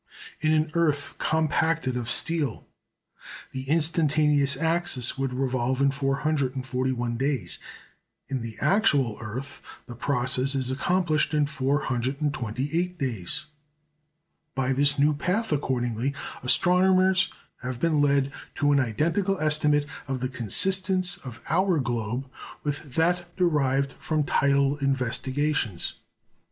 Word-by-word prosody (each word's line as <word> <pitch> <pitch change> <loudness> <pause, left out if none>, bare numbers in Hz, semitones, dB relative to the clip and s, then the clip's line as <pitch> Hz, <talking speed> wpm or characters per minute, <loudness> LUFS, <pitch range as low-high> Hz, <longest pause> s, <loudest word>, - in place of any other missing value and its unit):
In 155 0 +1
an 155 0 +1
earth 150 -4 0
compacted 160 -3 0
of 120 -1 -3
steel, 150 -4 0 0.9
the 130 0 -6
instantaneous 150 -3 +2
axis 165 -5 +2
would 135 -1 -2
revolve 130 0 -1
in 140 0 +3
441 130 -3 -1
days; 130 -9 -1 0.7
in 135 -2 -3
the 115 -1 -7
actual 145 - +2
earth, 130 +5 -6 0.2
the 120 - -9
process 130 +2 0
is 130 -1 -1
accomplished 155 +1 +1
in 150 -1 +3
428 140 +3 -2
days. 120 - -2 1.1
By 135 0 0
this 140 +2 +2
new 145 +2 +3
path, 180 +9 -1
accordingly, 130 -2 -1 0.3
astronomers 185 +6 +3 0.3
have 125 -1 -5
been 155 0 +2
led 140 -1 +2 0.2
to 145 0 +2
an 140 - +4
identical 165 - 0
estimate 150 -1 +3 0.2
of 135 -1 -3
the 130 +1 -2
consistence 185 - +3
of 125 -9 -10
our 185 +1 +2
globe 120 -1 -2 0.4
with 145 -2 -4
that 175 +2 +1
derived 140 -6 +1
from 155 -2 -1
tidal 140 0 +2
investigations. 135 - 0
140 Hz, 115 wpm, -26 LUFS, 130-155 Hz, 1.1 s, an